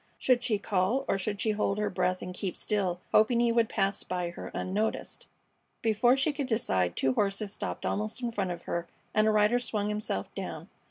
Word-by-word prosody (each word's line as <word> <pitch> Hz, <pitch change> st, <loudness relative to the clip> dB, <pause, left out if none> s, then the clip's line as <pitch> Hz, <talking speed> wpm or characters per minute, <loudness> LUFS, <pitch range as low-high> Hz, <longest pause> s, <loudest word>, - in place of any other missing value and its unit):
Should 250 Hz, -2 st, +2 dB
she 215 Hz, -, +1 dB
call, 205 Hz, +6 st, 0 dB
or 195 Hz, -, +1 dB
should 200 Hz, +1 st, -2 dB
she 220 Hz, -, +2 dB
hold 205 Hz, -1 st, 0 dB
her 210 Hz, -1 st, 0 dB
breath 185 Hz, 0 st, 0 dB
and 180 Hz, -, -5 dB
keep 185 Hz, 0 st, -3 dB
still, 190 Hz, -4 st, 0 dB
hoping 225 Hz, +2 st, +5 dB
he 235 Hz, 0 st, +3 dB
would 230 Hz, -1 st, +3 dB
pass 195 Hz, 0 st, 0 dB
her -, -, -14 dB
by 175 Hz, -1 st, -2 dB, 0.3 s
unnoticed? 210 Hz, +4 st, -2 dB, 0.6 s
Before 230 Hz, +3 st, +4 dB
she 290 Hz, +3 st, +2 dB
could 280 Hz, -2 st, -2 dB
decide 95 Hz, -, +1 dB
two 130 Hz, -, +2 dB
horses 200 Hz, +4 st, 0 dB
stopped -, -, -4 dB
almost 215 Hz, +3 st, -1 dB
in 240 Hz, -2 st, -2 dB
front 195 Hz, -4 st, -1 dB
of 175 Hz, -1 st, -5 dB
her 170 Hz, 0 st, -3 dB, 0.3 s
and 215 Hz, 0 st, +4 dB
a -, -, +5 dB
rider 215 Hz, +3 st, +4 dB
swung 210 Hz, -4 st, -2 dB
himself 210 Hz, -, -2 dB
down. -, -, -6 dB
210 Hz, 205 wpm, -29 LUFS, 185-225 Hz, 0.6 s, hoping